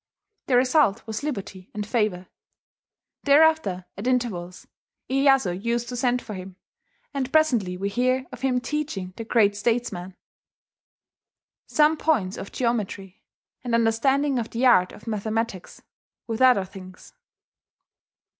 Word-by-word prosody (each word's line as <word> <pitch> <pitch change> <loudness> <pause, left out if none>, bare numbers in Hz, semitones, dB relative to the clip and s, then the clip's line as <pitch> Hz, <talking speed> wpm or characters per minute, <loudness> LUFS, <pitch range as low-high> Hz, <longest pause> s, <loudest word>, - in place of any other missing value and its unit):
The 250 - +4
result 255 -4 +3
was 220 -1 -4
liberty 195 -10 -6
and 210 -1 -3
favour. 210 -5 -1 1.0
Thereafter, 285 - +4
at 205 +6 -5
intervals, 205 -9 -2 0.5
Iyeyasu 265 -9 +2
used 235 0 -1
to 250 - -5
send 245 0 0
for 215 - -7
him; 185 -1 -8 0.6
and 270 -2 -3
presently 240 -13 +2
we 195 +2 -2
hear 255 +4 0
of - - -10
him 260 -2 +1
teaching 255 -11 -4
the 230 - -6
great 220 -3 +3
statesman 205 -4 -2 1.5
"some 310 +1 +3
points 215 -13 +1
of 195 - -7
jeometry, 205 -5 -3 0.4
and 240 -2 0
understanding 260 +4 +2
of 230 - -4
the 240 +3 -1
art 185 -8 +5
of 210 - -14
mathematickes, 220 -2 -3 0.4
with 225 +1 -4
other 250 -7 +5
things." 185 -1 -13
230 Hz, 125 wpm, -24 LUFS, 195-260 Hz, 1.5 s, art